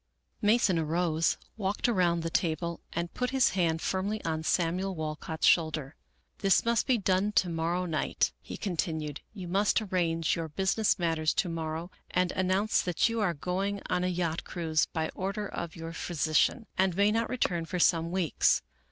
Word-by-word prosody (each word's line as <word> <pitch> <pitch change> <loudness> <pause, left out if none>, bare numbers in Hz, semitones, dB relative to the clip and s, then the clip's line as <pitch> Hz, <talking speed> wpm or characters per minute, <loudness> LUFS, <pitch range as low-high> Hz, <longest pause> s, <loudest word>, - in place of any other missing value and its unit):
Mason 210 -5 +3
arose, 165 0 +1 0.2
walked 200 +2 0
around 175 -7 +2
the 165 - -3
table, 170 0 -1
and 170 +1 -3
put 250 0 -1
his 265 0 +3
hand 165 -4 0
firmly 200 +3 -1
on 160 -1 -1
Samuel 180 +4 0
Walcott's 155 0 -3
shoulder. 155 -4 +2 0.2
" - - -43
This 195 +2 +3
must 235 -1 +2
be 255 -3 +4
done 200 0 +1
to 190 -3 +3
morrow 170 +2 -1
night," 160 -3 0
he - - -8
continued; 160 -6 -3
" - - -40
you 185 -4 -6
must 195 +5 +2
arrange 170 -6 0
your 165 -1 -3
business 190 +6 +1
matters 165 -2 0
to 180 - +1
morrow 165 +1 -4 0.2
and 180 0 +1
announce 190 +3 +1
that 180 +5 +1
you 230 -1 -1
are 180 -5 +1
go 180 +6 -2
ing 200 0 -2
on 180 0 +1
a - - +1
yacht 170 -2 -1
cruise, 160 -3 0
by 160 -1 -2
order 200 +2 -3
of 170 - -6
your 165 -1 -7
physician, 160 +4 +1
and 190 -2 +3
may 200 +2 +4
not 225 +1 0
return 180 -9 0
for 180 - -4
some 165 -1 +3
weeks. 175 -3 +2
175 Hz, 180 wpm, -29 LUFS, 165-195 Hz, 0.2 s, be